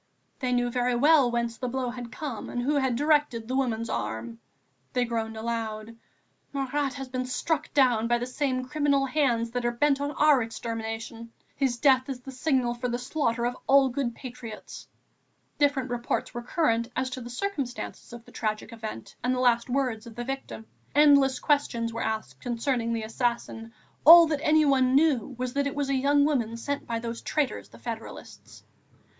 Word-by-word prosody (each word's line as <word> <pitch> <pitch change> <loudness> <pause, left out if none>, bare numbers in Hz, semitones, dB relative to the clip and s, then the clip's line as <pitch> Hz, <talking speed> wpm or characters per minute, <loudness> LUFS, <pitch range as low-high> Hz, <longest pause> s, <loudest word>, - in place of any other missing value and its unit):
They 255 -2 -1
knew 245 0 +1
very 245 0 +1
well 285 0 +5
whence 235 -1 -2
the 250 - -3
blow 250 0 -2
had 245 -1 -8
come, 275 -8 -5
and 245 - -3
who 285 +4 +1
had 265 -3 +1
directed 290 -5 +1
the 255 - -2
woman's 230 -4 0
arm. 115 +1 -4 0.5
They 250 -1 +2
groaned 225 -1 -3
aloud: 225 -1 -4 0.6
"Marat 275 0 -1
has 270 -1 -6
been 255 0 -3
struck 315 +5 -1
down 245 -5 +4
by 240 0 +3
the 240 - -3
same 255 0 -1
criminal 285 -1 +1
hands 255 -5 +1
that 245 0 -2
are 240 - +2
bent 280 +3 +2
on 285 - -1
our 295 -2 +4
extermination. 225 0 -5 0.2
His 265 -3 0
death 260 0 +3
is 255 -2 -5
the 270 - -9
signal 260 -2 0
for 245 +1 -3
the 240 - -1
slaughter 245 -2 -1
of 245 +1 -1
all 275 -1 +6
good 245 -2 -2
patriots." 235 -4 -9 0.7
Different 280 -3 +1
reports 240 0 -2
were 240 - -4
current, 235 -3 0
as 260 0 -1
to 255 - -5
the 240 - -8
circumstances 260 -5 -4
of 235 -1 -10
the - - -16
tragic 215 +1 -3
event 220 - -7
and 250 +1 +1
the - - -2
last 240 -1 +2
words 245 -4 -1
of 225 - -11
the 240 - -4
victim; 270 -3 -6 0.3
endless 280 -3 +6
questions 235 -6 0
were 230 - -4
asked 215 -12 -3
concerning 240 -1 -1
the 230 -1 -2
assassin, 230 0 -2 0.3
all 335 +2 +11
that 305 -3 -2
anyone 280 -5 +4
knew 275 -4 +2
was 250 0 -3
that 280 0 +1
it 280 - -4
was 285 -1 -1
a - - +1
young 285 +2 +3
woman 235 -7 0
sent 285 +4 -4
by 230 -2 -1
those 230 0 -5
traitors, 295 -4 -2
the - - -15
federalists. 225 -2 -9
250 Hz, 185 wpm, -27 LUFS, 230-275 Hz, 0.7 s, all